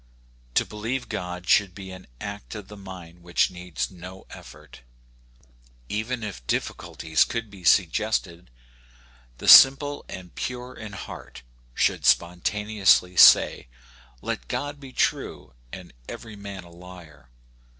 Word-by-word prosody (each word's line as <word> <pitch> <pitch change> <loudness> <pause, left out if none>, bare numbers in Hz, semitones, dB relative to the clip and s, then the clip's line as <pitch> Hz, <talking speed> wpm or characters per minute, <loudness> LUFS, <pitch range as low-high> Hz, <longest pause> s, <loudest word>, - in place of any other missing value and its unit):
To - - +3
believe 115 +5 -4
God 90 -3 -5
should 95 -4 +3
be 95 -1 -9
an 95 0 -11
act 100 +2 -7
of 105 -2 -9
the 105 - -10
mind 90 -3 -11
which 85 +1 +1
needs 90 -9 -5
no 90 +1 -11
effort. - - -13 1.1
Even 115 +3 -3
if 100 - -6
difficulties 80 0 0
could 115 -3 -5
be 95 -3 -13
suggested, 90 - +1 0.9
the - - -7
simple 145 +2 +8
and 90 -2 -9
pure 125 0 -5
in 110 -2 -9
heart 100 - -9 0.3
should - - +1
spontaneously 90 +1 +2
say, - - +6 0.3
" - - -27
Let - - -4
God 145 +4 -4
be 135 -2 -11
true 65 - -2 0.2
and - - -10 0.2
every 110 -2 -9
man 100 -2 -8
a 85 - -16
liar." 85 -7 -14
95 Hz, 130 wpm, -25 LUFS, 90-110 Hz, 1.1 s, simple